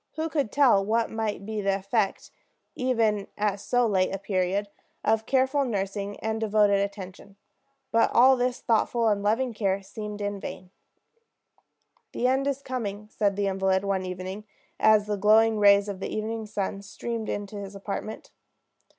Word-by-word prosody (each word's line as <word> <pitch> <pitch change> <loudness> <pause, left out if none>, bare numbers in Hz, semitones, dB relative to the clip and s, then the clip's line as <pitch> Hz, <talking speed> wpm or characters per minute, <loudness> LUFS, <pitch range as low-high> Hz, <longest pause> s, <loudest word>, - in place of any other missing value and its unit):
Who 320 0 -2
could 285 -8 -1
tell 255 -9 +4
what 225 +3 0
might 220 -3 -3
be 215 0 -3
the 195 -1 +1
effect, 195 +1 -1 0.4
even 225 -5 0
at 205 -1 0
so 245 +4 +1
late 190 -4 +1
a 195 - -2
period, 195 +1 -1 0.4
of 220 0 +1
careful 265 +2 +2
nursing 200 -3 -3
and 220 0 -2
devoted 210 -2 +3
attention? 200 -1 -6 0.6
But 230 - +4
all 260 +2 +6
his 250 0 -1
thoughtful 230 0 +1
and 205 -1 +1
loving 225 +4 +1
care 200 -2 -1
seemed 210 +1 -7
in 205 -1 -3
vain. 185 -1 -8 1.4
"The 245 - -2
end 265 +2 +2
is 275 0 -2
coming," 210 -5 -4
said 200 -2 0
the 200 0 0
invalid 190 0 +1
one 195 -1 0
evening, 185 +3 -6 0.3
as 215 -1 +5
the 210 -1 -2
glowing 220 +2 +4
rays 200 0 +6
of 200 -2 -5
the - - -4
evening 220 0 -3
sun 200 -1 -3
streamed 225 +3 -5
into 205 0 -4
his 200 0 -7
apartment. 200 +2 -6
210 Hz, 160 wpm, -26 LUFS, 200-225 Hz, 1.4 s, all